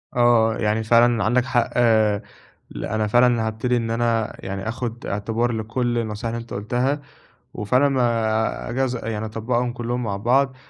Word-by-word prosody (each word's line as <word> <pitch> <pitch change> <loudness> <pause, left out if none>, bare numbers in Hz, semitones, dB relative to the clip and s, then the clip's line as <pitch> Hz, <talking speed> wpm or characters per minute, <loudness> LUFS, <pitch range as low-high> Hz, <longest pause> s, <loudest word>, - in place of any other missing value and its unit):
آه، 120 -2 +4
يعني 110 +1 0
فعلًا 115 -1 +4
عندك 120 +4 +2
حق 120 -3 0 1.0
ل - - -5
أنا 110 0 -1
فعلًا 120 0 +3
هابتدي 120 +3 0
إن 115 -1 -2
أنا 115 -1 0
يعني 95 +2 -5
آخد 120 -1 -5
اعتبار 115 +4 -1
لكُلّ 120 +2 -2
النصايح 115 0 -3
اللي 115 - -3
أنت 115 - -11
قُلتها 125 +8 -1 0.5
وفعلًا 125 +7 +2
ما 110 - 0
أجاز 130 0 -1
يعني 110 -1 -3
أطبّقهم 120 +2 -1
كلّهم 120 +1 -3
مع 105 -4 -2
بعض، 130 +5 +1
115 Hz, 150 wpm, -22 LUFS, 110-120 Hz, 1.0 s, آه